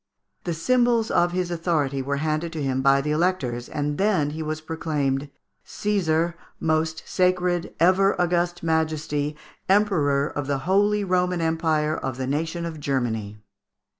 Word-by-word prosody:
The 170 -2 -1
symbols 240 +4 +2
of 175 0 +3
his 180 -1 -2
authority 155 -5 0
were 140 +2 -2
handed 155 +3 -1
to 155 -3 -3
him 130 -1 0
by 135 0 +4
the 150 +2 -2
Electors, 150 -8 0
and 145 0 -2
then 190 -8 +2
he 160 +2 -5
was 155 0 -3
proclaimed, 150 -4 -2 0.3
"Cæsar, 170 -5 0 0.3
most 160 0 0
sacred, 180 -1 +1
ever 190 +3 +4
august 175 0 0
Majesty, 155 -2 -1 0.3
Emperor, 155 -9 +3
of 145 -2 -4
the 140 -1 0
Holy 205 +3 +3
Roman 180 -1 +1
Empire 160 -2 +1
of 130 -2 -4
the 130 - -2
nation 160 +5 -2
of 160 -2 -6
Germany." 110 -7 -2
160 Hz, 145 wpm, -24 LUFS, 145-180 Hz, 0.3 s, by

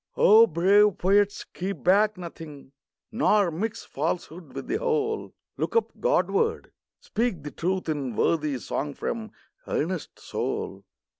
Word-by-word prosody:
O 225 +2 +7
brave 200 +4 +4
poets, 200 +2 +2
keep 185 -2 -4
back 205 +3 +4
nothing; 160 -6 -9 0.4
Nor 210 -5 +3
mix 210 +7 -4
falsehood 160 +1 -4
with - - -5
the 400 - -1
whole! 445 -2 -1 0.3
Look - - -2
up 460 - +2
Godward! 460 -2 +1 0.3
speak 215 -9 -2
the 150 - -6
truth 185 +1 -2
in 140 -7 -2
Worthy 150 -1 +1
song 145 +3 -4
from 225 -2 -4 0.4
earnest - - -3
soul - - -4
190 Hz, 130 wpm, -26 LUFS, 160-225 Hz, 0.4 s, O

